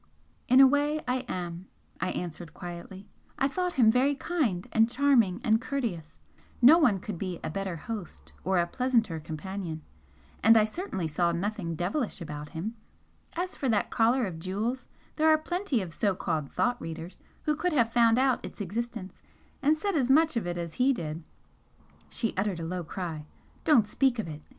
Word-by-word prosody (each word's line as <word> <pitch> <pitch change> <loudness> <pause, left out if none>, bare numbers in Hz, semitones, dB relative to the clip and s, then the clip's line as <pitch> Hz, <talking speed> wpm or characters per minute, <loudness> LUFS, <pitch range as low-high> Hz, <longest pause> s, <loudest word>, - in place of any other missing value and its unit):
"In 255 0 +6
a 270 - +10
way 290 +3 +2
I 250 +1 +1
am," 175 0 -5 0.3
I 185 - -1
answered, 170 -3 -6
quietly 180 +2 -8 0.3
"I 270 - +2
thought 360 +4 -2
him 230 -4 +5
very 265 +4 +2
kind 260 - -1
and 225 +1 +4
charming 245 -7 +3
and 220 +1 +3
courteous 220 - -4 0.4
no 285 +8 +8
one 230 - +4
could 185 -2 -6
be 185 -3 -4
a - - -3
better 195 0 -3
host 205 +1 -7
or 190 +1 +1
a 170 - +3
pleasanter 225 -4 0
companion. 160 +1 -6 0.6
And 225 +1 +7
I 215 - +5
certainly 215 - -4
saw 170 +3 +1
nothing 175 -1 -2
'devilish' 195 - -2
about 150 -3 -7
him. 190 +8 -5 0.6
As 360 +2 -3
for 270 - -1
that 210 -3 +1
collar 235 +2 +3
of 170 -5 -6
jewels, 215 +9 -3 0.3
there 315 0 +4
are 310 - +6
plenty 310 - -1
of 170 -3 -8
so 200 0 +1
called 155 -5 -2
'thought 245 0 0
readers' 165 +2 -7 0.2
who 300 - +1
could 355 +3 -1
have 235 -5 +2
found 230 -1 +5
out 260 -1 +2
its - - -9
existence 215 0 -5 0.4
and 300 +2 +3
said 400 +2 -1
as 260 -4 +1
much 315 +2 +4
of 225 -6 -1
it 175 0 -3
as 170 -2 -4
he 270 +2 +5
did 160 -6 -5 0.4
" - - -31
She 225 - -2
uttered 195 -2 -1
a 165 - -4
low 180 +1 -3
cry. 160 -3 -5 0.4
"Don't 250 -9 +5
speak 260 +3 +1
of 220 - -3
it!" 150 -1 -7
215 Hz, 185 wpm, -28 LUFS, 175-260 Hz, 0.6 s, a